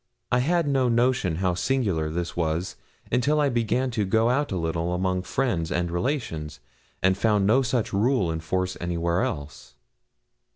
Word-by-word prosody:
I 125 - +3
had 165 +4 +1
no 135 -3 +2
notion 120 -7 +2
how 90 +1 0
singular 95 -7 0
this 85 +2 -3
was 85 +1 -1 0.4
until 140 +5 +2
I 145 -1 +3
began 120 +2 0
to 110 -3 0
go 110 +5 +2
out 145 +1 0
a 95 - -1
little 85 +1 -1
among 95 0 0
friends 95 -6 -1
and 90 -1 -1
relations, 85 - -3 0.4
and 95 0 +4
found 105 -1 +2
no 115 +7 +4
such 125 -4 -1
rule 105 -3 +2
in 80 - -3
force 95 +3 -2
anywhere 85 0 0
else. 70 0 -5
95 Hz, 165 wpm, -25 LUFS, 85-125 Hz, 0.4 s, and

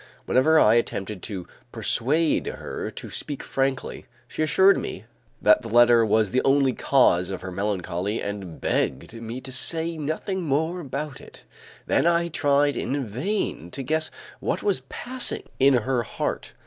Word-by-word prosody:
Whenever 155 +5 +4
I 110 - +5
attempted 105 -4 -1
to 95 -5 -5 0.2
persuade 150 +7 +1
her - - -5
to - - -7
speak 145 -2 -4
frankly, 135 -1 -2 0.2
she - - -5
assured 190 +6 +5
me 95 - -5 0.3
that 105 +3 +5
the 115 - -8
letter 120 0 +5
was 110 -1 +2
the 130 - +2
only 135 -1 +3
cause 90 -12 +3
of 95 -2 -5
her 95 0 -6
melancholy 95 +1 -2
and 100 -5 -6
begged 70 - -1
me 115 +2 -6
to 130 +1 -7
say 160 +5 +1
nothing 160 +6 -3
more 160 +3 -1
about 140 -2 -5
it. - - -15 0.4
Then - - +2
I 170 0 +2
tried 145 -2 +2
in 140 0 -2
vain 125 - -3
to 135 - -4
guess 155 +4 0 0.3
what - - -2
was 405 - +1
passing 255 0 0 0.2
in 135 0 +5
her 125 +1 +1
heart. 110 - -4
130 Hz, 160 wpm, -24 LUFS, 105-155 Hz, 0.4 s, I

